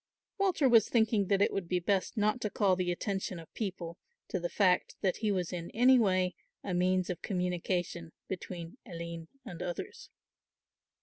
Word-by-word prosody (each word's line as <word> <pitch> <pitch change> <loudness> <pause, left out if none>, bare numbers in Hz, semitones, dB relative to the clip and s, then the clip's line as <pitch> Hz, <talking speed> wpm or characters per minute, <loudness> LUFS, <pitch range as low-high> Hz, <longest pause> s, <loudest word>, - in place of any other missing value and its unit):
Walter 370 -8 +3
was 230 -4 +6
thinking 220 -4 +3
that 200 0 +4
it - - +1
would 195 -3 -2
be 180 +1 +1
best 195 +5 0
not 215 +3 +2
to 210 - -1
call 195 -2 +3
the 180 -1 0
attention 190 0 -2
of 165 -1 -12
people 180 -5 -4 0.3
to 185 - -1
the 175 0 -2
fact 185 -3 +2
that 190 -3 +1
he 215 -2 0
was 180 -3 -1
in 170 -1 -4
any 250 +2 +6
way 185 -4 +2 0.3
a 190 - -3
means 185 +1 +2
of 180 - -6
communication 180 -2 -2 0.2
between 180 +2 -6
Aline 170 -4 -7 0.2
and 180 -8 -7
others. 175 - -5
185 Hz, 175 wpm, -31 LUFS, 175-210 Hz, 0.3 s, was